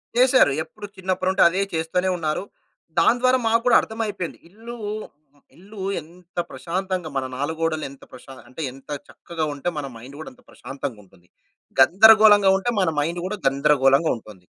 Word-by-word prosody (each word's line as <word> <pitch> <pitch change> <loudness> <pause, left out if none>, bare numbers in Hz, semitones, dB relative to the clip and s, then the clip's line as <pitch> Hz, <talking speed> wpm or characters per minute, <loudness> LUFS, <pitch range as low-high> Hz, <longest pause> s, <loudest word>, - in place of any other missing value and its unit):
చేశారు. 255 - +5
ఎప్పుడు 210 +3 -11
చిన్నప్పుడుంటే 185 0 -1
అదే 185 +3 -1
చేస్తూనే 165 +3 -1
ఉన్నారు. 155 +2 -2 0.6
దానిద్వారా 255 +7 +3
మాకు 230 +1 +2
గూడా 245 - +5
అర్థమైపోయింది. 210 -6 -5
ఇల్లు, 230 +5 -10 0.8
ఇల్లు 195 +3 -12 0.2
ఎంత 175 +3 -20
ప్రశాంతంగా 185 -1 -4
మన 130 - -1
నాలుగోడలు 160 +2 -2
ఎంత 140 - -16
ప్రశా 135 +2 -12
అంటే 130 +6 -9
ఎంత 135 +3 -17 0.2
చక్కగా 165 -2 -5
ఉంటే 140 +5 -3
మన 145 - -3
మైండ్ 130 +5 -12
గూడా 155 - -8
అంత 255 - -24
ప్రశాంతంగుంటుంది. 105 -10 -9 0.5
గందరగోళంగా 205 +5 +7
ఉంటే 195 +5 -2
మన 185 - +2
మైండ్ 165 +4 -1
గూడా 205 +3 -4
గందరగోళంగా 135 +2 +3
ఉంటుంది. 100 -5 -15
170 Hz, 140 wpm, -22 LUFS, 140-205 Hz, 0.8 s, గందరగోళంగా